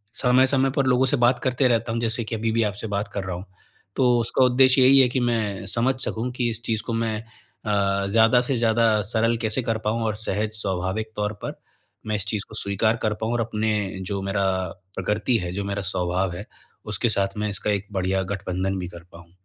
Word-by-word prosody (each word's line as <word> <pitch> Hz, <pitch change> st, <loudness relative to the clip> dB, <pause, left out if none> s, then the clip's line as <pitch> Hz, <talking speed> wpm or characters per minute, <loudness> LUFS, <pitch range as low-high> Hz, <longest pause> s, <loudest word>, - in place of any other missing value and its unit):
समय-समय 130 Hz, +1 st, +3 dB
पर 140 Hz, -, +2 dB
लोगों 130 Hz, +1 st, +4 dB
से 140 Hz, -, +2 dB
बात 120 Hz, +1 st, +4 dB
करते 130 Hz, 0 st, +2 dB
रहता 115 Hz, -1 st, +1 dB
हूँ 115 Hz, -, -1 dB
जैसे 115 Hz, 0 st, 0 dB
कि 115 Hz, -, -3 dB
अभी 115 Hz, +1 st, -1 dB
भी 115 Hz, +1 st, +2 dB
आपसे 105 Hz, +2 st, -6 dB
बात 100 Hz, 0 st, -2 dB
कर 100 Hz, -, -3 dB
रहा 90 Hz, -1 st, -3 dB
हूँ। 90 Hz, -, -7 dB, 0.5 s
तो 125 Hz, -2 st, +3 dB
उसका 120 Hz, +3 st, +2 dB
उद्देश्य 130 Hz, +1 st, +5 dB
यही 135 Hz, +1 st, +7 dB
है 130 Hz, -, +6 dB
कि 130 Hz, -, -1 dB
मैं 110 Hz, -5 st, -1 dB
समझ 125 Hz, +3 st, +2 dB
सकूँ 115 Hz, +3 st, -2 dB
कि 120 Hz, -2 st, 0 dB
इस 115 Hz, 0 st, -4 dB
चीज़ 110 Hz, -2 st, -1 dB
को 115 Hz, -, -2 dB
मैं 115 Hz, -1 st, -1 dB, 0.5 s
अ, 100 Hz, -2 st, +1 dB
ज़्यादा 115 Hz, +3 st, +5 dB
से 125 Hz, +1 st, 0 dB
ज़्यादा 115 Hz, -2 st, +3 dB
सरल 115 Hz, 0 st, +2 dB
कैसे 110 Hz, +3 st, 0 dB
कर 115 Hz, -1 st, 0 dB
पाऊँ 115 Hz, +2 st, 0 dB
और 110 Hz, -, -1 dB
सहज, 105 Hz, 0 st, -1 dB
स्वाभाविक 95 Hz, +3 st, -2 dB
तौर 105 Hz, +1 st, -1 dB
पर, -, -, -5 dB, 0.5 s
मैं 110 Hz, -, 0 dB
इस 105 Hz, -1 st, -2 dB
चीज़ 105 Hz, 0 st, -2 dB
को 105 Hz, -, -10 dB
स्वीकार 105 Hz, +2 st, 0 dB
कर 110 Hz, -, +1 dB
पाऊँ 110 Hz, +1 st, -1 dB
और 120 Hz, -, +1 dB
अपने 110 Hz, -1 st, -1 dB, 0.4 s
जो 100 Hz, -1 st, -2 dB
मेरा, 100 Hz, 0 st, 0 dB, 0.5 s
प्रकृति 105 Hz, +5 st, 0 dB
है, 90 Hz, -3 st, -3 dB
जो 100 Hz, +2 st, -3 dB
मेरा 100 Hz, 0 st, -2 dB
स्वभाव 90 Hz, 0 st, 0 dB
है, -, -, -7 dB, 0.4 s
उसके -, -, 0 dB
साथ 100 Hz, +1 st, 0 dB
मैं 105 Hz, 0 st, -1 dB
इसका 100 Hz, +1 st, -1 dB
एक 100 Hz, 0 st, -2 dB
बढ़िया 95 Hz, 0 st, 0 dB
गठबंधन 95 Hz, 0 st, -2 dB
भी 90 Hz, -, -4 dB
कर 85 Hz, -1 st, -11 dB
पाऊँ। 85 Hz, 0 st, -14 dB
110 Hz, 220 wpm, -24 LUFS, 100-120 Hz, 0.5 s, यही